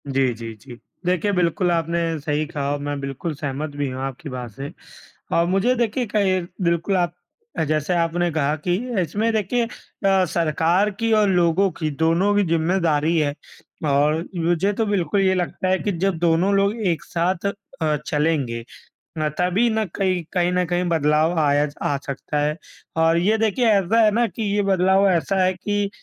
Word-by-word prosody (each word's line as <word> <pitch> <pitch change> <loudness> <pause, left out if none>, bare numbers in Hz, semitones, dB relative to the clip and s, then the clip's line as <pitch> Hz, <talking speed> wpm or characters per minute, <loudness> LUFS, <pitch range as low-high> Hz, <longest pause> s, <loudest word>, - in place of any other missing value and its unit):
जी, 135 -2 +1
जी, 115 0 -7
जी। 120 -2 -12 0.3
देखिए 180 +3 +1
बिल्कुल, 180 0 +1
आपने 165 0 0
सही 150 +1 -1
कहा 145 -2 -3
और 145 - -2
मैं 145 0 -3
बिल्कुल 140 +4 -4
सहमत 145 +1 -4
भी 145 -1 -2
हूँ 130 +1 -5
आपकी 135 +3 -5
बात 125 -3 -6
से 135 +6 -7 0.7
और 170 - +3
मुझे 195 +8 +2
देखिए, 240 +1 0
कहीं 200 -4 +1 0.2
बिल्कुल 170 +3 +1
आप 175 -1 0 0.5
जैसे 155 +3 0
आपने 170 +1 +1
कहा 150 -1 0
कि 175 - +3 0.3
इसमें 205 +7 0
देखिए 220 +3 0
अ, 195 -5 -1
सरकार 170 +4 +1
की 230 0 0
और 210 -2 +4
लोगों 180 +1 +3
की, 155 -3 -3
दोनों 165 +7 +2
की 205 - +3
ज़िम्मेदारी 165 -1 +1
है 145 -2 +1 0.6
और 150 +3 +2
मुझे 175 +4 +1
तो 225 +2 0
बिल्कुल 200 -2 0
ये 190 -1 +3
लगता 185 +1 -2
है 190 0 +2
कि 205 - -1
जब 185 0 -1
दोनों 170 +3 +2
लोग 200 +2 +2 0.2
एक 165 - -8
साथ 175 +3 -1 0.3
अ, 155 -1 +1
चलेंगे 145 -6 0 0.5
ना 155 -1 0
तभी 185 +7 +2
ना 220 -1 0
कहीं 185 -3 0
कहीं 180 -1 +2
न 180 0 +1
कहीं 175 +1 0
बदलाव 160 +1 +2
आया 145 -1 +3 0.2
आ 140 - +1
सकता 140 +2 -3
है 150 +1 0 0.4
और 165 +1 +3
ये 205 +6 +2
देखिए 225 +2 +1
ऐसा 200 +2 +3
है 215 - +5
ना 235 +3 +2
कि 225 - -5
ये 205 - +2
बदलाव 190 0 +3
ऐसा 180 +2 +1
है 185 0 +2
कि 205 +2 -2
170 Hz, 180 wpm, -22 LUFS, 150-195 Hz, 0.7 s, है